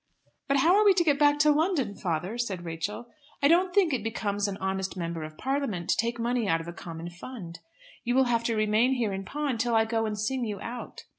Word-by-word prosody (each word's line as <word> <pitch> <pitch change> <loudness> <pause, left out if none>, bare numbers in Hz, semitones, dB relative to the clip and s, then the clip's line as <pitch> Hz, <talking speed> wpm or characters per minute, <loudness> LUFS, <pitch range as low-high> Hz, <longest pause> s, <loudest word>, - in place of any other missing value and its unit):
"But 275 - +2
how 330 +7 +5
are 420 - +5
we 400 -2 +6
to 350 - +3
get 290 -4 +2
back 290 0 +5
to 300 0 +5
London, 295 - +1
father?" 180 +2 -3
said 190 -7 -3
Rachel. 170 +9 -4 0.3
"I - - +7
don't 355 +4 +4
think 360 -5 +3
it 240 -5 -1
becomes 205 -2 -1
an 195 -1 -4
honest 190 0 -3
Member 170 -2 -3
of 155 0 -8
Parliament 265 -10 -1
to - - +3
take 235 +1 -1
money 235 -1 0
out 165 -2 +2
of 165 - -8
a 170 - -6
common 170 0 -8
fund. 180 -2 -9 0.4
You 245 0 0
will 265 - +5
have 235 -2 +1
to 230 - +1
remain 215 +4 +3
here 230 -6 -1
in 195 0 -4
pawn 280 -1 -2
till 235 0 +1
I 225 0 +4
go 225 0 0
and 210 -1 -3
sing 245 +5 -1
you 210 -4 -3
out." 240 +4 -7
225 Hz, 240 wpm, -28 LUFS, 190-265 Hz, 0.4 s, I